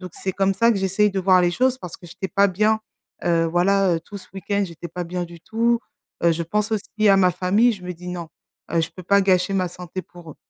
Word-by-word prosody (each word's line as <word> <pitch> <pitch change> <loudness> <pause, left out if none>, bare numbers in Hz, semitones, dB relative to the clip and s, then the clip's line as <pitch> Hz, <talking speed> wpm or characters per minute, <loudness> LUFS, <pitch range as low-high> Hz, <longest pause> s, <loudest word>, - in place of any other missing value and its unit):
donc 180 -2 -9
c'est 190 - -3
comme 195 +1 +1
ça 230 +4 +4
que - - -1
j'essaye 195 +2 +2
de 195 -1 -2
voir 185 0 +5
les 175 - +3
choses 255 +6 +1
parce 180 -9 -8
que 175 - -14
j'étais 190 +3 -6
pas 200 +3 +4
bien, 215 +4 +2 0.4
heu, 165 -1 +2
voilà, 180 +2 +2
heu, - - -4
tout 200 +5 -10
ce - - -17
week-end 200 +2 -1
j'étais 170 0 -9
pas 180 0 -5
bien 175 +1 -3
du 170 -1 -12
tout, 230 +5 +1 0.5
heu, 170 - +5
je 165 +1 -2
pense 210 +5 -1
aussi 215 0 0
à 195 - +6
ma 185 -1 +5
famille, 200 +8 +3
je 200 -4 -9
me 180 - -4
dis: 180 +2 -10
«Non, 175 -2 -5 0.4
heu, 165 - +3
je 165 - -1
peux 185 - -8
pas 200 +3 +4
gâcher 185 0 +2
ma 185 -2 +1
santé 180 +1 -7
pour 175 -3 -13
eux». - - -25
185 Hz, 265 wpm, -22 LUFS, 175-200 Hz, 0.5 s, à